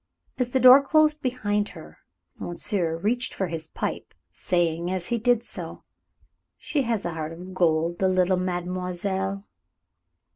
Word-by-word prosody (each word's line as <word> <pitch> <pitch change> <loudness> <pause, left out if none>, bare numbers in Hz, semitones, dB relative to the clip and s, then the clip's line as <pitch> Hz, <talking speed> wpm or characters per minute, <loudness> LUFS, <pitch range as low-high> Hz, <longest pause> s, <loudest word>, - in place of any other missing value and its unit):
As 250 -1 0
the 260 - +1
door 255 +2 +9
closed 305 +1 +3
behind 210 -5 -1
her, - - -13 0.4
monsieur 175 -2 -1
reached 235 +8 -1
for 190 - -1
his 165 -2 -4
pipe, - - -5 0.2
saying, 170 -1 0
as 185 -1 -3
he 235 - 0
did 240 0 +2
so, - - -8 0.7
"She 295 - -1
has 230 -5 -1
a 170 - -1
heart 160 -1 -4
of 180 +3 -10
gold, 170 -1 +1
the 190 - +3
little 185 0 +2
mademoiselle." 185 +2 -3
185 Hz, 145 wpm, -25 LUFS, 175-235 Hz, 0.7 s, door